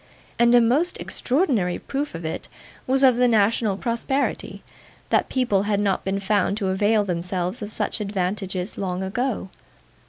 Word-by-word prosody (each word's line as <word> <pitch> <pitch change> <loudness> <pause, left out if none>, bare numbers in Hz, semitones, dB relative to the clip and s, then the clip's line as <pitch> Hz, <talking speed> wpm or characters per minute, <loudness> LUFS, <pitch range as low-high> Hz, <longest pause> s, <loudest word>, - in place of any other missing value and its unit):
And 235 0 +5
a 240 - +7
most 280 +10 +2
extraordinary 245 - 0
proof 280 - -4
it 160 -1 -5 0.4
was 265 +1 +2
of 255 -3 +6
the 250 0 +4
national 215 -2 +2
prosperity, 245 +5 -2 0.5
that - - +2
people 240 -7 +1
had 205 -1 +2
not 200 -2 0
been 195 +1 -1
found 200 0 +1
to 195 -3 -1
avail 205 +3 +2
themselves 180 +3 -3
of 210 - -4
such 215 - -3
advantages 195 -1 -3
long 185 -1 -2
ago. 215 +1 -2
205 Hz, 150 wpm, -23 LUFS, 190-245 Hz, 0.5 s, a